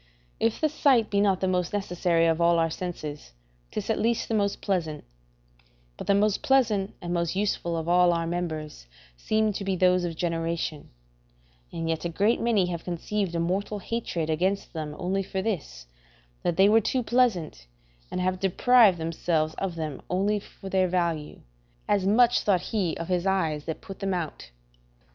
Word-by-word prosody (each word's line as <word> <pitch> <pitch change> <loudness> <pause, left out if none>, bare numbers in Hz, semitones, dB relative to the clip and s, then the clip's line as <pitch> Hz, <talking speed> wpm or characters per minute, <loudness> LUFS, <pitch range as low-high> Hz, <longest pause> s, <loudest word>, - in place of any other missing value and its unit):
If 225 0 +1
the 310 - +3
sight 270 -7 +2
be 200 0 +2
not 195 -2 +2
the 190 - +1
most 180 0 0
necessary 180 -4 +1
of 165 0 +2
all 170 0 +4
our 165 -1 +1
senses, 155 - -6 0.4
'tis - - -4
at - - 0
least 230 +1 0
the - - -1
most 200 -2 0
pleasant; 170 -6 -2 0.9
but - - -8
the 200 - +4
most 205 0 +2
pleasant 220 -8 +2
and 175 0 -3
most 170 0 -1
useful 190 -4 -1
of 160 0 -4
all 175 0 +5
our 170 -1 0
members 160 - -4 0.3
seem 215 - 0
to 200 - -4
be 195 -1 0
those 180 0 +3
of 170 -2 -3
generation; 165 -2 -2 0.8
and 165 -1 -4
yet 160 -1 -1
a 170 - -1
great 205 +7 +1
many 225 -5 +2
have 170 -2 -4
conceived 180 +1 -2
a - - 0
mortal 190 +5 -1
hatred 200 -6 -3
against 185 +5 -1
them 155 -2 -5
only 190 +2 -1
for 190 0 -4
this, 145 - -4 0.6
that 175 - -1
they 195 +1 +6
were 220 +2 +5
too 255 +4 0
pleasant, 215 - 0 0.4
and - - -3
have 185 0 0
deprived 205 +1 +5
themselves 160 -1 -1
of 190 -3 -3
them 155 -4 -5
only 200 +3 +1
for 195 0 -12
their 190 -1 +2
value: 170 -4 -2 0.5
as 200 -2 +2
much 235 +4 +5
thought 190 -4 +2
he 195 -7 0
of 165 - -5
his 180 0 0
eyes 160 -6 0
that 160 - -5
put 195 -3 -10
them 195 -2 -1
out. 165 -4 -5
180 Hz, 180 wpm, -26 LUFS, 165-205 Hz, 0.9 s, they